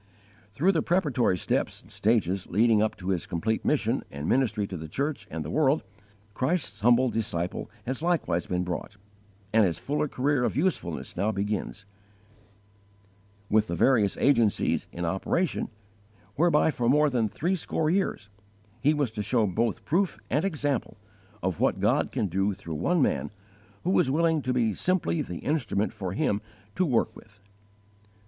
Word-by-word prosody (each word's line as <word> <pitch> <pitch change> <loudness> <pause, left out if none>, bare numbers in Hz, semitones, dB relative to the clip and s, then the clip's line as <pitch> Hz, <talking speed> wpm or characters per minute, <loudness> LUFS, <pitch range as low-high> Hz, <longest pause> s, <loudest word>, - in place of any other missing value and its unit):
Through 175 - +4
the - - +1
preparatory 145 - +1
steps - - -1
and - - -17
stages 100 -4 +1
leading 110 +3 +3
up 110 - +1
to 95 0 -6
his 90 -1 -1
complete 100 +5 -1
mission - - +1
and 70 +2 -5
ministry 110 -6 +1
to 95 - -6
the 80 -2 -6
church 135 - -3
and 80 -1 -5
the 75 - -5
world, 150 -1 +2 0.5
Christ's 130 - -1
humble 120 +4 +4
disciple 90 -6 -2 0.2
has 130 +3 -3
likewise 160 - 0
been 90 0 -1
brought, 90 +4 -5 0.6
and 110 0 +6
his 85 -6 +1
fuller 150 +1 -1
career 140 0 0
of 125 - 0
usefulness 85 - -1
now 100 +5 +1
begins, 105 0 -3 1.6
with 110 +1 +3
the 85 - -2
various 105 +1 +3
agencies 115 -7 +2
in 85 0 -4
operation 95 - -1 0.7
whereby 160 0 +3
for 120 -4 0
more 150 +2 +4
than 115 -4 +1
threescore 160 - -1
years 185 - -1 0.5
he 150 +3 +3
was 145 -6 0
to 110 - -4
show 115 +1 +2
both 110 +3 -1
proof 185 +4 +1
and 150 - +2
example 145 - -1 0.5
of 90 -3 -1
what - - +2
God - - +2
can - - 0
do 95 +2 0
through 85 -4 -7
one 165 - +2
man 70 - 0 0.5
who 185 +3 +3
is - - +2
willing 160 +2 +2
to 130 - -1
be 115 -4 +1
simply 175 - 0
the 90 - -6
instrument 115 -9 0
for 95 -5 -4
Him 100 +1 0 0.3
to 185 - +1
work 120 -5 +1
with. 100 -1 -16
115 Hz, 160 wpm, -27 LUFS, 95-145 Hz, 1.6 s, and